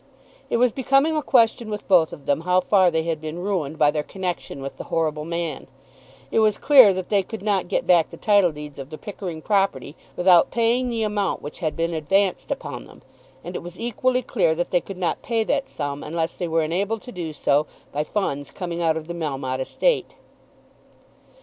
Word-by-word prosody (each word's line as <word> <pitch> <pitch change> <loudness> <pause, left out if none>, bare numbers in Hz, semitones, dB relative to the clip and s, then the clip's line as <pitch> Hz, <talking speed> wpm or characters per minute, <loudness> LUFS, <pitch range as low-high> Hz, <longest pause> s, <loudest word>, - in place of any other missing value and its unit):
It - - +1
was 245 0 +3
becoming 275 +5 +2
a 305 - +1
question 230 -4 +2
with 210 -1 -5
both 175 -5 +4
of 140 - -11
them 140 +2 +1
how 180 +2 +3
far 185 0 +4
they 160 -1 0
had 165 -2 -2
been 155 +1 -5
ruined 175 -5 -2
by 150 -1 +4
their 150 0 -1
connection 180 -3 -5
with 135 0 -7
the - - -6
horrible 155 -2 -1
man. 170 -1 -4 0.6
It - - +2
was 215 -1 +3
clear 265 -8 +7
that 185 -1 -4
they 205 -2 +3
could 215 +2 -8
not 200 -4 0
get - - -1
back 170 -3 +4
the - - -11
title 200 -5 +3
deeds 150 -2 -9
of 135 0 -7
the 155 - -8
Pickering 180 -6 -7
property 195 -9 0 0.2
without 175 -1 +5
paying 240 +2 +1
the 230 -2 -1
amount 205 -3 -1
which 145 - -8
had 155 -3 -2
been 165 +1 -1
advanced 190 +5 0
upon - - -5
them, - - -17 0.4
and - - -7
it - - -3
was 175 +1 -10
equally 250 +2 0
clear 175 -10 +1
that 175 +2 -2
they 175 - +3
could 195 +2 -9
not 180 -2 -1
pay 230 -2 0
that 275 +4 -1
sum 145 -1 -4
unless 165 +1 -3
they 175 - -3
were 165 0 +1
enabled 200 +7 -1
to 250 - -9
do 175 -6 -5
so 150 0 +1 0.2
by 150 +1 -1
funds 145 -5 -2
coming 175 -2 -5
out 160 -1 +2
of 160 -1 -7
the 170 - -4
Melmotte 135 -6 -3
estate. 485 - 0
175 Hz, 210 wpm, -23 LUFS, 155-210 Hz, 0.6 s, clear